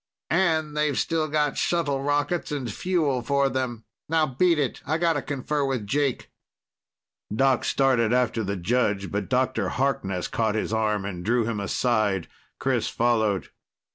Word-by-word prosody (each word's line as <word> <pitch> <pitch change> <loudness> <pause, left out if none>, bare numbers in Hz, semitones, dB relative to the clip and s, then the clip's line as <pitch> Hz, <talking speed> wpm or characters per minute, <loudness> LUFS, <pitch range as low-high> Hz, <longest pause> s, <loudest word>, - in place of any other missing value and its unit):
And 160 -3 +1
they've 150 -2 +1
still 160 -2 0
got 150 -1 0
shuttle 145 -6 0
rockets 145 +4 0
and 130 -7 -3
fuel 155 - 0
for 140 +2 +1
them. 125 -3 -3 0.2
Now 160 -1 +3
beat 165 +5 +2
it. 140 -4 -1
I 155 - 0
gotta 165 -3 +1
confer 145 +1 -2
with 130 -6 -1
Jake." 140 +4 -1 1.0
Doc 130 +4 +2
started 125 -5 +2
after 120 -2 +1
the 100 0 -2
judge, 100 0 0
but 105 +1 -3
Dr. 130 0 +1
Harkness 100 -9 -1
caught 110 -2 0
his 110 0 -1
arm 105 -2 0
and 90 -3 -5
drew 115 +3 +2
him 110 -2 -2
aside. 105 -3 0 0.3
Chris - - 0
followed. 110 -5 +1
130 Hz, 150 wpm, -25 LUFS, 110-145 Hz, 1.0 s, Now